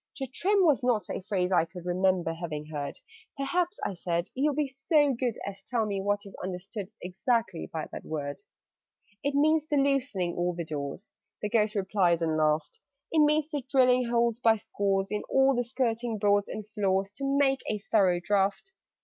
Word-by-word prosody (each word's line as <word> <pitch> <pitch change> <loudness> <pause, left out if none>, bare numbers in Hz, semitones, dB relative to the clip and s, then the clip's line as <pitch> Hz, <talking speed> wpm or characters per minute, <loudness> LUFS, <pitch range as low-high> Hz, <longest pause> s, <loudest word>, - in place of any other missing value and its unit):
"To 270 - -3
trim" 385 +9 +2
was 300 -5 +4
not 230 -6 +1
a - - -3
phrase 190 -2 -1
I 170 -3 +4
could 175 0 -11
Remember 180 -1 +1
having 160 -3 -5
heard: 145 -2 -5 0.4
"Perhaps," 345 +8 -1
I - - -1
said, 170 0 -2
"you'll 285 +2 +1
be 300 -1 +1
so 280 +2 +2
good 245 -2 -2
As 200 0 -6
tell 230 +1 -1
me 200 -2 -2
what 205 +1 0
is 200 - -10
understood 190 +2 -5
Exactly 190 0 -1
by 160 -2 -4
that - - -7
word?" 145 +2 -4 0.8
"It 285 0 0
means 310 +1 +3
the 295 - +1
loosening 275 -11 +1
all 175 0 -1
the 170 -1 -4
doors," 150 +6 -5 0.3
The 210 - 0
Ghost 215 -1 +2
replied, 185 -4 +2
and 160 -1 +1
laughed: 155 0 0 0.3
"It 320 - +3
means 300 0 +4
the 290 -2 -2
drilling 255 -2 +4
holes 235 -1 +1
by 225 -3 +5
scores 195 -2 -1
In 210 - -1
all 270 0 +4
the 245 -1 +1
skirting 235 -2 -1
boards 205 0 +2
and 215 -1 -6
floors, 195 -2 0
To 275 - -5
make 270 -1 +3
a 215 - 0
thorough 195 -4 +2
draught. 200 - 0
210 Hz, 185 wpm, -28 LUFS, 180-265 Hz, 0.8 s, by